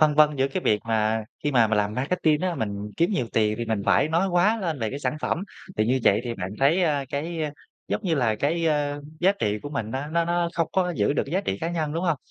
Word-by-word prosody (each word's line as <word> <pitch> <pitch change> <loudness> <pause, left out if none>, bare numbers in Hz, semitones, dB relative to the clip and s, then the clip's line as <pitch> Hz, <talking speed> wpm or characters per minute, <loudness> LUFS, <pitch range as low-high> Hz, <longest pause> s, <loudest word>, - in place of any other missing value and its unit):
phân 155 -1 +5
vân 150 -1 +5
giữa 135 +1 +2
cái 180 +6 -3
việc 105 -1 +2
mà 110 0 +1 0.2
khi 145 - +1
mà 120 -3 +5
mình 110 -1 +1
làm 105 +1 0
marketing 150 +3 +1
á, 185 -2 0
mình 105 -4 -4
kiếm 170 +5 +2
nhiều 125 - 0
tiền 105 -1 +2
thì 120 - -2
mình 110 -3 -1
phải 155 - +4
nói 170 +4 +1
quá 185 +6 +3
lên 165 -6 -2
về 110 - -1
cái 140 - -4
sản 150 - -2
phẩm. 175 - -1 0.3
Thì 110 - +2
như 130 +2 +2
vậy 100 +3 +5
thì 120 -1 -3
bạn 95 -2 -5
thấy, 160 +7 +4
a, 145 -4 +1
cái, 160 +3 -3
a, 150 - -1 0.4
giống 215 - -1
như 170 -3 +2
là, 120 -6 +2
cái, 165 +6 0
a, 145 -2 0 0.2
giá 190 +3 +5
trị 105 - -1
của 145 - -5
mình 115 -7 -3
nó 135 +4 -3
nó 170 +2 +1
nó 175 0 0
không 165 -1 0
có 180 -2 +1
giữ - - +2
được - - +1
cái 145 - -8
giá 190 - +2
trị 95 - -3
cá 165 - -1
nhân, 155 -3 -2
đúng 170 +3 -2
hông? 165 -4 +2
145 Hz, 285 wpm, -25 LUFS, 115-170 Hz, 0.4 s, phân